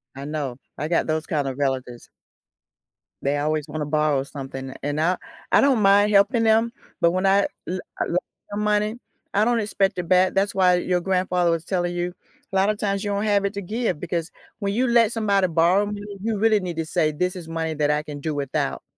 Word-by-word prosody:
I 140 Hz, +1 st, -7 dB
know. 145 Hz, -5 st, -4 dB, 0.2 s
I 150 Hz, -, -2 dB
got 165 Hz, -1 st, +1 dB
those 155 Hz, 0 st, -1 dB
kind 145 Hz, -4 st, -1 dB
of 135 Hz, 0 st, -4 dB
relatives 130 Hz, -4 st, -2 dB, 1.2 s
they 140 Hz, +1 st, +1 dB
always 155 Hz, +1 st, -1 dB
wanna 150 Hz, 0 st, -3 dB
borrow 150 Hz, -2 st, +1 dB
something, 135 Hz, -2 st, -7 dB
and 145 Hz, +1 st, -1 dB
I 180 Hz, +2 st, +2 dB, 0.3 s
I -, -, +6 dB
don't 265 Hz, -6 st, +3 dB
mind 205 Hz, +1 st, +5 dB
helping 210 Hz, +4 st, +4 dB
them, 225 Hz, +1 st, +3 dB, 0.3 s
but 170 Hz, -, +5 dB
when 185 Hz, +2 st, 0 dB
I 195 Hz, +1 st, +4 dB, 0.2 s
l 185 Hz, +1 st, -2 dB, 0.2 s
l 175 Hz, -, 0 dB, 0.3 s
some 205 Hz, +1 st, -2 dB
money, 210 Hz, +2 st, +1 dB, 0.4 s
I 210 Hz, +2 st, +3 dB
don't 240 Hz, -1 st, +2 dB
expect 195 Hz, -2 st, 0 dB
it 170 Hz, -, -4 dB
back, 185 Hz, 0 st, +4 dB
that's 195 Hz, +1 st, +1 dB
why 180 Hz, -1 st, +5 dB
your 180 Hz, 0 st, 0 dB
grandfather 180 Hz, -2 st, +1 dB
was 165 Hz, -1 st, -1 dB
telling 175 Hz, -2 st, -1 dB
you, 175 Hz, 0 st, -2 dB, 0.4 s
a -, -, -2 dB
lotta 200 Hz, +2 st, +3 dB
times 200 Hz, -1 st, -1 dB
you 205 Hz, -, -2 dB
don't 200 Hz, +1 st, -1 dB
have 200 Hz, -2 st, +2 dB
it 200 Hz, -, -1 dB
to 200 Hz, -, -3 dB
give 210 Hz, -4 st, -2 dB
because 170 Hz, -1 st, -3 dB, 0.3 s
when 200 Hz, -1 st, -1 dB
you 250 Hz, +3 st, +1 dB
let 235 Hz, -2 st, +4 dB
somebody 200 Hz, -4 st, +2 dB
borrow 175 Hz, +5 st, +3 dB
money, 205 Hz, -1 st, -6 dB
you 225 Hz, -2 st, -1 dB
really 215 Hz, 0 st, +3 dB
need 180 Hz, -3 st, -4 dB
to 165 Hz, -, -1 dB
say 155 Hz, -1 st, +1 dB
this 180 Hz, +5 st, -1 dB
is 170 Hz, -3 st, -8 dB
money 160 Hz, -1 st, -2 dB
that 150 Hz, 0 st, +1 dB
I 150 Hz, 0 st, 0 dB
can 145 Hz, -1 st, -7 dB
do 155 Hz, 0 st, -3 dB
without. 130 Hz, -, -2 dB
180 Hz, 215 wpm, -23 LUFS, 155-205 Hz, 1.2 s, I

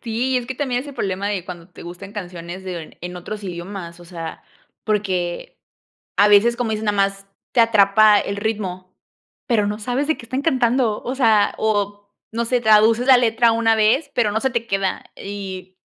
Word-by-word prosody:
Sí, 250 Hz, +3 st, -1 dB
es 245 Hz, -1 st, -2 dB
que 260 Hz, -, -4 dB
también 250 Hz, -2 st, -1 dB
es -, -, -12 dB
el 285 Hz, -, -9 dB
problema 195 Hz, -4 st, -2 dB
de 195 Hz, -4 st, -2 dB
cuando 175 Hz, -1 st, -9 dB
te -, -, -13 dB
gustan 180 Hz, +4 st, -9 dB
canciones 180 Hz, -2 st, -7 dB
de 175 Hz, -4 st, -7 dB
en 180 Hz, +1 st, -6 dB
otros 205 Hz, +4 st, -7 dB
idiomas, 175 Hz, -1 st, -7 dB
o 175 Hz, -, -13 dB
sea, 165 Hz, -2 st, -8 dB, 0.4 s
porque 190 Hz, -5 st, -2 dB, 0.6 s
a 205 Hz, -, +6 dB
veces, 215 Hz, +4 st, +5 dB
como 240 Hz, -3 st, -1 dB
dices, 215 Hz, 0 st, -2 dB
nada 205 Hz, -1 st, 0 dB
más 195 Hz, 0 st, 0 dB, 0.3 s
te 240 Hz, -, +4 dB
atrapa 215 Hz, -1 st, +5 dB
el 200 Hz, -, -2 dB
ritmo, 190 Hz, -4 st, -4 dB, 0.6 s
pero 225 Hz, -4 st, +2 dB
no 210 Hz, +1 st, -3 dB
sabes 250 Hz, +6 st, -2 dB
de 315 Hz, -, +1 dB
qué -, -, -11 dB
están 255 Hz, +3 st, -3 dB
cantando, 245 Hz, -6 st, +1 dB
o 255 Hz, -, -3 dB
sea, 220 Hz, -6 st, +3 dB
o 205 Hz, -1 st, -1 dB, 0.2 s
no 230 Hz, +1 st, -1 dB
sé, 245 Hz, 0 st, 0 dB
traduces 220 Hz, +3 st, +4 dB
la 260 Hz, -2 st, +8 dB
letra 230 Hz, -1 st, +3 dB
una 225 Hz, 0 st, +3 dB
vez, 230 Hz, +7 st, +2 dB
pero 220 Hz, -4 st, +1 dB
no 220 Hz, -, 0 dB
se 265 Hz, +3 st, 0 dB
te 235 Hz, -1 st, -2 dB
queda 195 Hz, -2 st, -1 dB
y 190 Hz, -2 st, -7 dB
210 Hz, 195 wpm, -21 LUFS, 190-235 Hz, 0.6 s, la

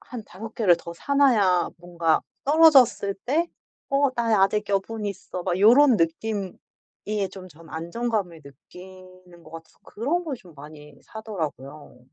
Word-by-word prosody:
한 245 Hz, -3 st, -9 dB
5 220 Hz, +5 st, -10 dB
개를 190 Hz, -7 st, +3 dB
더 170 Hz, -, -9 dB
사 280 Hz, +11 st, -4 dB
놔야 210 Hz, -11 st, +3 dB
뭔가 170 Hz, -2 st, 0 dB, 0.2 s
떨어졌을 275 Hz, -9 st, +5 dB
때 320 Hz, +7 st, +1 dB, 0.4 s
'어 275 Hz, 0 st, +2 dB
나 225 Hz, -4 st, +2 dB
아직 205 Hz, +1 st, +1 dB
여분 210 Hz, +2 st, -2 dB
있어.' 185 Hz, -2 st, -6 dB
막 180 Hz, 0 st, -1 dB
요런 245 Hz, +4 st, +6 dB
느낌이 190 Hz, +4 st, -2 dB, 0.8 s
좀 185 Hz, -1 st, -11 dB
전 165 Hz, -1 st, -17 dB
안정감을 175 Hz, 0 st, -3 dB
느끼는 185 Hz, +4 st, -15 dB
것 155 Hz, -, -15 dB
같아서 165 Hz, 0 st, -12 dB
그런 310 Hz, +11 st, -2 dB
걸 285 Hz, -5 st, -4 dB
좀 180 Hz, -7 st, -18 dB
많이 150 Hz, 0 st, -13 dB
사더라고요. 155 Hz, -, -7 dB
195 Hz, 255 characters per minute, -24 LUFS, 170-230 Hz, 0.8 s, 요런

